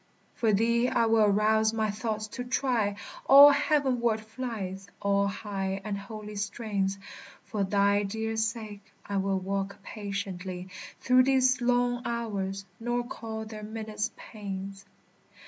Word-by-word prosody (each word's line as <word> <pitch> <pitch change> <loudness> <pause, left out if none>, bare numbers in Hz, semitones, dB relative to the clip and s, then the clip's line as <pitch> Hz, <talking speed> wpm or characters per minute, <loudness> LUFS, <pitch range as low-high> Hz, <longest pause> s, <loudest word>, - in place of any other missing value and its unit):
For 225 -2 +1
thee 235 +4 +3
I 230 - +2
will 225 -1 +4
arouse 215 +2 +3
my 220 -2 0
thoughts 215 0 -3
to 245 - -5
try 245 -5 0 0.3
All 280 +2 +10
heavenward 270 -6 +2
flights, 215 -5 -5
all 200 0 +2
high 195 -1 -3
and 210 -1 -3
holy 210 +1 -8
strains; 200 -2 -2 0.5
For 210 -2 -2
thy 200 +1 +3
dear 220 +2 -3
sake 220 -2 -3
I 200 - -2
will 195 0 +1
walk 195 +1 -3
patiently 190 -3 -5 0.3
Through 255 0 +5
these 260 -1 +3
long 245 0 +2
hours, 200 -5 -3
nor 240 +1 -1
call 220 -2 -6
their 215 -1 -8
minutes 215 0 -4
pains. 195 -2 -7
215 Hz, 130 wpm, -28 LUFS, 200-235 Hz, 0.5 s, All